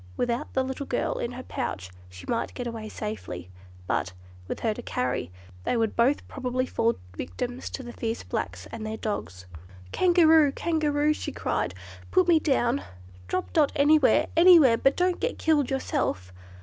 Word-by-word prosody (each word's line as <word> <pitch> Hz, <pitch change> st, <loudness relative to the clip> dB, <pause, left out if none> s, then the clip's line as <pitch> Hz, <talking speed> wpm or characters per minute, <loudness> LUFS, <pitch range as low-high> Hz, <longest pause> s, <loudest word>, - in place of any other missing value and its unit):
Without 240 Hz, 0 st, -1 dB
the 265 Hz, -, +2 dB
little 265 Hz, +1 st, -5 dB
girl 245 Hz, -, -1 dB
in 235 Hz, -, -3 dB
her 255 Hz, +1 st, -7 dB
pouch, 95 Hz, -, -4 dB, 0.2 s
she 90 Hz, 0 st, -12 dB
might 230 Hz, -, -2 dB
get 245 Hz, -, -4 dB
away 225 Hz, -2 st, -5 dB
safely; 95 Hz, -, -6 dB, 0.3 s
but, 90 Hz, 0 st, -1 dB, 0.3 s
with -, -, -5 dB
her 225 Hz, -2 st, +1 dB
to -, -, -8 dB
carry, 125 Hz, -8 st, -2 dB, 0.3 s
they 240 Hz, -, 0 dB
would 225 Hz, -2 st, 0 dB
both 255 Hz, +5 st, +2 dB
probably 255 Hz, -1 st, -2 dB
fall 230 Hz, -2 st, +1 dB, 0.2 s
victims 245 Hz, -, -5 dB
to 265 Hz, -, -6 dB
the 240 Hz, -1 st, -8 dB
fierce 225 Hz, 0 st, -3 dB
blacks -, -, -4 dB
and 230 Hz, -1 st, -6 dB
their 215 Hz, 0 st, -4 dB
dogs. 90 Hz, -, -4 dB, 0.5 s
"Kangaroo! 320 Hz, -5 st, +5 dB
Kangaroo!" 305 Hz, -2 st, +1 dB
she -, -, -5 dB
cried, -, -, -2 dB, 0.3 s
"put 370 Hz, -1 st, +3 dB
me 335 Hz, -2 st, +5 dB
down; 270 Hz, -3 st, +1 dB, 0.5 s
drop 185 Hz, -, -3 dB
Dot 300 Hz, -3 st, +4 dB
anywhere, 290 Hz, -3 st, +5 dB
anywhere, 330 Hz, -8 st, +7 dB
but 270 Hz, +4 st, +2 dB
don't 360 Hz, 0 st, +1 dB
get -, -, -2 dB
killed 300 Hz, -4 st, +2 dB
yourself!" 90 Hz, -, -2 dB
250 Hz, 165 wpm, -26 LUFS, 220-295 Hz, 0.5 s, anywhere